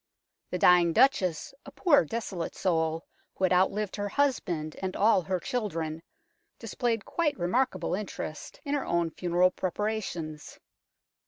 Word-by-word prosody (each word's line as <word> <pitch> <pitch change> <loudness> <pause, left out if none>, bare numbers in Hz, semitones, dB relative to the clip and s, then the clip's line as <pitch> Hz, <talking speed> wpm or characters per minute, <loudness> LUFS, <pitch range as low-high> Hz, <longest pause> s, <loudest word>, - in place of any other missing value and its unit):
The 180 - -2
dying 175 -1 +5
Duchess, 220 - +2
a - - -10
poor 295 - +4
desolate 190 -3 -4
soul, 160 -3 0 0.3
who - - -5
had 185 -1 +4
outlived 195 +3 +1
her 205 0 -2
husband 190 - -1
and 190 -1 -3
all 210 -2 +4
her 185 +1 -2
children, 165 -8 -3 0.6
displayed 230 -4 -2
quite 325 -4 0
remarkable 185 0 0
interest 185 -5 -5
in 285 - -2
her 285 - 0
own 170 -1 0
funeral 180 +1 +2
preparations. 180 -6 -4
185 Hz, 135 wpm, -28 LUFS, 170-220 Hz, 0.6 s, dying